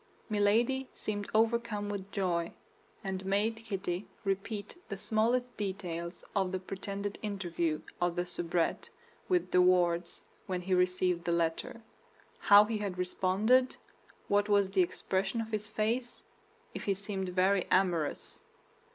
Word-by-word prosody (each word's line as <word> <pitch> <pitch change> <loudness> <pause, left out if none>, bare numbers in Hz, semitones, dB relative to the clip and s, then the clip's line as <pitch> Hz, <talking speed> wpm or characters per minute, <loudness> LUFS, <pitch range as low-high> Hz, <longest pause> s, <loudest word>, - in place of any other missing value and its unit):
Milady 230 +6 +2
seemed 205 -1 -4
overcome 225 -1 +1
with 200 -1 -5
joy, 175 -4 -1 0.5
and 190 -1 -3
made 205 +4 +1
Kitty 195 -4 -4 0.2
repeat 200 +1 -3
the 200 - -4
smallest 235 +4 +1
details 180 -4 -4
of 190 -2 +1
the 190 - 0
pretended 195 +2 -5
interview 175 -6 -2 0.2
of 175 -1 +1
the 175 0 0
soubrette 175 -1 -1 0.4
with 360 -2 +1
De 180 - +5
Wardes 175 -1 +2 0.2
when 180 -1 -2
he 185 +1 0
received 180 -1 +2
the 170 - -1
letter; 170 +7 -1 0.6
how 205 +1 +8
he 220 0 -2
had 200 -3 -3
responded; 195 +8 +2 0.5
what 205 +1 +2
was 200 -2 +3
the 195 -1 +4
expression 190 +4 -1
of 225 0 -4
his 210 -1 -2
face; 235 +4 -2 0.5
if - - -6
he 200 - +1
seemed 195 -1 -4
very 185 +1 +2
amorous. 175 -5 0
195 Hz, 135 wpm, -31 LUFS, 180-215 Hz, 0.6 s, how